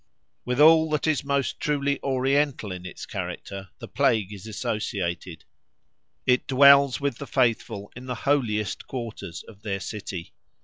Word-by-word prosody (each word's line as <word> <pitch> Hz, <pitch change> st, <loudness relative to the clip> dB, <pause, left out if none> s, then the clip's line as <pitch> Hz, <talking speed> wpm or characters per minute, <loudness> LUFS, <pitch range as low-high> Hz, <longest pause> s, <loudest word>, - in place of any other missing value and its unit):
With 125 Hz, +2 st, -1 dB
all 160 Hz, +1 st, +7 dB
that 150 Hz, -2 st, 0 dB
is 155 Hz, -3 st, +1 dB
most 140 Hz, -1 st, -1 dB
truly 140 Hz, -2 st, 0 dB
Oriental 135 Hz, -3 st, +1 dB
in 90 Hz, 0 st, -6 dB
its -, -, -8 dB
character 95 Hz, -1 st, -6 dB
the -, -, -9 dB
plague 105 Hz, -3 st, +1 dB
is 100 Hz, +1 st, -10 dB
associated; 100 Hz, -6 st, -3 dB, 0.8 s
it 125 Hz, 0 st, +2 dB
dwells 140 Hz, 0 st, +6 dB
with 140 Hz, -4 st, -2 dB
the 140 Hz, -, -6 dB
faithful 115 Hz, -5 st, 0 dB
in 125 Hz, +2 st, -9 dB
the 125 Hz, -, -2 dB
holiest 110 Hz, -8 st, 0 dB
quarters 115 Hz, -, -6 dB
of 105 Hz, -3 st, -14 dB
their 100 Hz, -2 st, -3 dB
city. 95 Hz, -5 st, -6 dB
125 Hz, 145 wpm, -25 LUFS, 100-140 Hz, 0.8 s, all